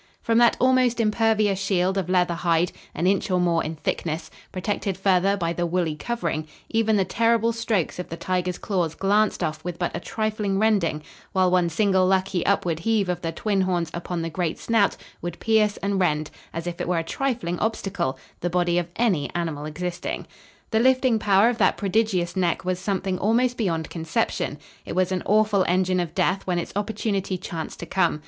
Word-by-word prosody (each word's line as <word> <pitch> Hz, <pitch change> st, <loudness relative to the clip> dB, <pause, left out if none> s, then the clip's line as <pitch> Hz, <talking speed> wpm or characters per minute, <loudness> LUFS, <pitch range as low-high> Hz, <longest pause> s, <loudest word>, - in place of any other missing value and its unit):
From 230 Hz, 0 st, +3 dB
that 240 Hz, -1 st, +5 dB
almost 255 Hz, -2 st, +3 dB
impervious 215 Hz, -2 st, +2 dB
shield 190 Hz, -1 st, +1 dB
of 190 Hz, -2 st, -2 dB
leather 180 Hz, -1 st, +2 dB
hide, 170 Hz, 0 st, +1 dB, 0.2 s
an 170 Hz, -, -1 dB
inch 195 Hz, +2 st, +2 dB
or 180 Hz, -1 st, +2 dB
more 170 Hz, -2 st, +2 dB
in 160 Hz, +1 st, -4 dB
thickness, 160 Hz, +1 st, -3 dB, 0.2 s
protected 195 Hz, 0 st, -2 dB
further 195 Hz, +1 st, +2 dB
by 170 Hz, -3 st, -1 dB
the 175 Hz, 0 st, -1 dB
woolly 170 Hz, -3 st, 0 dB
covering, 160 Hz, -6 st, -3 dB, 0.2 s
even 225 Hz, -1 st, +2 dB
the 190 Hz, -, +2 dB
terrible 230 Hz, +3 st, +2 dB
strokes 220 Hz, -7 st, -1 dB
of 180 Hz, -, -5 dB
the 165 Hz, -, -5 dB
tiger's 180 Hz, 0 st, -1 dB
claws 175 Hz, -6 st, -1 dB
glanced 205 Hz, 0 st, +2 dB
off 155 Hz, -1 st, -3 dB
with 175 Hz, -1 st, -4 dB
but 175 Hz, -, -2 dB
a -, -, -2 dB
trifling 215 Hz, -3 st, -2 dB
rending, 195 Hz, -8 st, +1 dB, 0.3 s
while 185 Hz, -1 st, +3 dB
one 180 Hz, -2 st, +3 dB
single 190 Hz, +2 st, +2 dB
lucky 190 Hz, -1 st, +1 dB
upward 175 Hz, -5 st, +1 dB
heave 210 Hz, 0 st, +1 dB
of 175 Hz, -1 st, -2 dB
the 165 Hz, -, -2 dB
twin 195 Hz, +3 st, 0 dB
horns 175 Hz, -4 st, 0 dB
upon 175 Hz, 0 st, -3 dB
the 165 Hz, -, -2 dB
great 170 Hz, -1 st, -2 dB
snout 225 Hz, -3 st, +2 dB, 0.2 s
would 175 Hz, 0 st, -5 dB
pierce 215 Hz, -2 st, +2 dB
and 200 Hz, -1 st, 0 dB
rend, 155 Hz, -3 st, 0 dB, 0.2 s
as 165 Hz, +1 st, -5 dB
if 175 Hz, -1 st, -4 dB
it -, -, -2 dB
were 180 Hz, -1 st, +1 dB
a 165 Hz, -, 0 dB
trifling 225 Hz, -4 st, -2 dB
obstacle, 195 Hz, -10 st, -1 dB, 0.2 s
the 175 Hz, -, -1 dB
body 175 Hz, 0 st, +2 dB
of 175 Hz, -1 st, -4 dB
any 195 Hz, -12 st, +1 dB
animal 160 Hz, -4 st, -2 dB
existing. 175 Hz, +3 st, -4 dB, 0.5 s
The 220 Hz, -, +3 dB
lifting 255 Hz, -1 st, +3 dB
power 200 Hz, +1 st, +4 dB
of 240 Hz, 0 st, 0 dB
that -, -, +3 dB
prodigious 195 Hz, -4 st, 0 dB
neck 180 Hz, -1 st, 0 dB
was 185 Hz, -1 st, -1 dB
something 190 Hz, -1 st, -2 dB
almost 240 Hz, +4 st, +2 dB
beyond 165 Hz, -9 st, -2 dB
conception. 165 Hz, -1 st, -1 dB, 0.3 s
It -, -, -6 dB
was 185 Hz, 0 st, +2 dB
an 185 Hz, -1 st, 0 dB
awful 210 Hz, -2 st, +3 dB
engine 185 Hz, +1 st, +2 dB
of 175 Hz, -2 st, -3 dB
death 190 Hz, +1 st, +1 dB
when 180 Hz, -1 st, +1 dB
its 175 Hz, -, -4 dB
opportunity 200 Hz, -2 st, -1 dB
chanced 165 Hz, -2 st, -6 dB
to -, -, -4 dB
come. 170 Hz, -3 st, +1 dB
185 Hz, 195 wpm, -24 LUFS, 175-210 Hz, 0.5 s, that